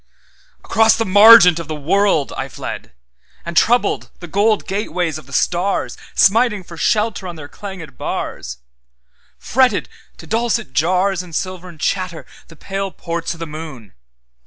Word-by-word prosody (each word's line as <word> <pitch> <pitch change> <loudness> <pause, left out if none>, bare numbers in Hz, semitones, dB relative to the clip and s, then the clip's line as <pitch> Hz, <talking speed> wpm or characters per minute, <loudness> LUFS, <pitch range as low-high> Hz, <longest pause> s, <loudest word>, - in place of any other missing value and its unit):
Across 225 0 +4
the 225 - 0
margent 195 -3 +8
of 165 - -7
the 155 - -4
world 165 0 +1
I 135 +1 -4
fled, - - -7 0.5
And 170 0 -6
troubled 235 +2 +2
the 175 - -8
gold 205 +5 +1
gateways 180 -5 -2
of 145 - -17
the - - -15
stars, 180 +7 0 0.2
Smiting 210 0 +3
for 170 - -12
shelter 210 +1 0
on 175 - -7
their 150 -3 -9
clangèd 190 - -10
bars; 65 0 -5 0.8
Fretted 250 -3 +1 0.3
to - - -12
dulcet 230 +5 -1
jarsAnd 180 +1 0
silvern 180 -2 -5
chatter 185 0 -2 0.2
the 165 - -15
pale 195 +4 -4
ports 170 -1 -5
o' - - -14
the 165 - -5
moon. 150 - -9
185 Hz, 145 wpm, -18 LUFS, 160-205 Hz, 0.8 s, margent